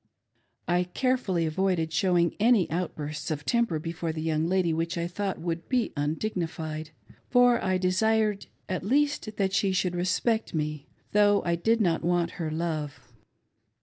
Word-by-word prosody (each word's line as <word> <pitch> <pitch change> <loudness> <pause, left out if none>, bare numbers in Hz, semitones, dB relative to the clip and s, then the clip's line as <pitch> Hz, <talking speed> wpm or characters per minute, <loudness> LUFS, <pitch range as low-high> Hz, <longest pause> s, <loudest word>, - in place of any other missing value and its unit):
I 175 +1 +2
carefully 195 -4 0
avoided 165 -1 0
showing 175 -3 +2
any 225 -3 +4
outbursts 150 -4 -3
of 150 -2 -3
temper 235 -9 +1
before 165 +1 -3
the 155 0 -5
young 160 0 0
lady 180 -2 +1
which 165 +2 -2
I 170 - -1
thought 190 +2 -3
would 170 0 -4
be 250 -4 0
undignified, 160 0 -3 0.4
for 245 -1 +4
I 185 -1 +1
desired 210 +3 +1 0.2
at 185 -1 -3
least 275 -1 0
that 195 -2 0
she 195 0 +2
should 185 -1 0
respect 185 +4 0
me, 150 -2 -3 0.2
though 205 -1 +4
I 170 - +1
did 225 +7 +1
not 170 -5 +2
want 175 0 +1
her 160 - -1
love. 155 -2 -3
175 Hz, 150 wpm, -27 LUFS, 160-205 Hz, 0.4 s, any